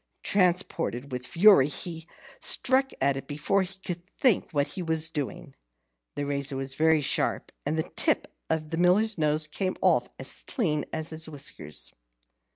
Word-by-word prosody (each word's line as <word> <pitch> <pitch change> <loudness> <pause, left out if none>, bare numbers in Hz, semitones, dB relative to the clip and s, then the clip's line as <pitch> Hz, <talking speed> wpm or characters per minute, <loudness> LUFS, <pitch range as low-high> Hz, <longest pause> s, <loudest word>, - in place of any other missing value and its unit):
Transported 170 - 0
with 125 0 -5
fury, 175 -5 +6
he 165 +2 -3 0.3
struck 265 +1 +4
at 140 0 +2
it 135 - -7
before 150 +7 0
he 190 +1 -6
could 175 -1 -4
think 210 +3 +2
what 145 -2 0
he 190 - -5
was 160 -1 +1
doing. 145 -4 -5 0.6
The 145 - -2
razor 140 -1 -3
was 135 0 -1
very 160 +2 +3
sharp, 140 - 0 0.2
and 155 +2 0
the 160 - -1
tip - - 0 0.2
of 155 -1 -2
the 165 - -2
Miller's 185 +4 +3
nose 155 0 +2
came 185 +5 -3
off - - +3
as - - -3
clean 155 - 0
as 160 0 -3
his 160 0 -3
whiskers. 75 - -5
160 Hz, 160 wpm, -27 LUFS, 145-180 Hz, 0.6 s, fury